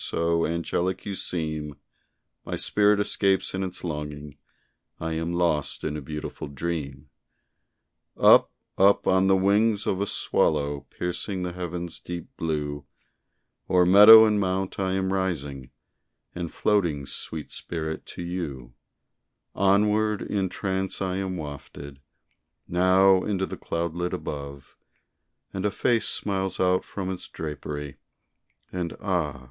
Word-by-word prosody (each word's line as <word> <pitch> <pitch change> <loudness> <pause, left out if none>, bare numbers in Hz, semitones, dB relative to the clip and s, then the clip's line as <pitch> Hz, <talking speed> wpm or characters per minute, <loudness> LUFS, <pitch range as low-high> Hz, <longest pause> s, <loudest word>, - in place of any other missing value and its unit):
so 85 0 0
angelic 85 +2 -2
you 100 - -3
seem, 80 -5 -3 0.7
My - - -4
spirit 105 0 +3
escapes 100 -1 +1
in 95 - -2
its 95 -1 -6
longing 75 -3 -5 0.6
I 80 0 -3
am 80 +1 -2
lost 85 -4 0
in 75 - -2
a 75 - -4
beautiful 75 +2 -6
dream. 70 -2 -5 1.1
Up, - - +7 0.3
up 100 +1 +5
on 95 +1 +3
the 95 - +5
wings 105 +2 +2
of 95 - -1
a 100 - 0
swallow 70 -6 0
Piercing 90 +2 -3
the 90 - -3
heaven's 85 -1 -5
deep 90 +5 -7
blue, 75 - -3 0.9
O'er 90 -1 +4
meadow 105 +4 +10
and 105 -1 +2
mount 95 0 -1
I 95 -1 0
am 95 0 0
rising, 75 -9 -3 0.6
And 85 -2 -5
floating, 85 -9 +1
sweet 80 +2 -5
spirit, 80 -2 -4
to - - -7
you; 75 -9 -5 0.8
Onward, 105 +2 +2
in 95 -2 -1
trance 95 0 -2
I 95 -1 -2
am 95 -1 -3
wafted, 70 -2 -8 0.7
Now 95 +1 +4
into 95 -2 -1
the - - -6
cloudlet 85 +1 -3
above; 70 -1 -6 0.8
And 95 - -3
a 105 - +2
face 115 +3 +1
smiles 95 -2 -1
out 90 0 +2
from 95 -2 -5
its 95 - -6
drapery, 75 -2 -6 0.8
And 90 -2 -4
ah! 85 - -1
90 Hz, 130 wpm, -26 LUFS, 75-95 Hz, 1.1 s, meadow